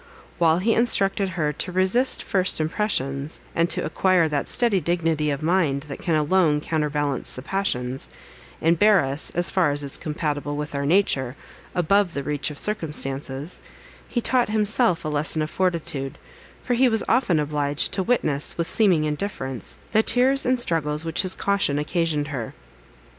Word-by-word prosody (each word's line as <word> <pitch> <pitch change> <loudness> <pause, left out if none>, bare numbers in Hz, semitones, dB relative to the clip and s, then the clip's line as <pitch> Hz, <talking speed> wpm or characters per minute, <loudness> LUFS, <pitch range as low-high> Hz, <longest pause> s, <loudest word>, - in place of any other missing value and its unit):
While 165 -1 +4
he 220 +5 +1
instructed 200 -4 +2
her 150 -2 0
to 180 - -1
resist 190 +8 +2
first 190 -3 0
impressions, 155 -5 -2
and 165 +1 +1
to - - -1
acquire 175 +1 +2
that 145 -2 -2
steady 225 -6 +2
dignity 165 -2 0
of 145 +1 -3
mind, 160 -5 +1
that 140 - -6
can 165 - 0
alone 155 0 +2
counterbalance 150 -3 -2
the 130 - -8
passions, 135 -9 -3 0.5
and 165 0 +3
bear 210 -2 +5
us, 135 +2 -1
as 175 0 +2
far 185 -5 +2
as 145 0 0
is 140 - +1
compatible 150 -1 -3
with 150 0 -5
our 140 0 -2
nature, 140 -8 +1 0.4
above 180 +1 +2
the 140 - -3
reach 145 +1 -2
of 150 - -9
circumstances, 145 -6 -3 0.5
he 240 - -2
taught 245 -2 +1
himself 215 -4 +2
a - - -1
lesson 155 +1 +1
of 155 - -5
fortitude; 160 -7 -2 0.5
for 245 - -1
he 250 +1 +4
was 225 -2 +2
often 225 -10 +2
obliged 145 -1 -1
to 195 - 0
witness, 155 - 0
with 170 -1 -1
seeming 185 -8 +2
indifference, 150 - -3
the 220 - +4
tears 255 +4 +3
and 255 0 +2
struggles 155 -7 0
which 165 -1 0
his 185 -1 +1
caution 200 -8 0
occasioned 150 -1 -1
her. 125 -6 -5
160 Hz, 165 wpm, -23 LUFS, 145-195 Hz, 0.5 s, bear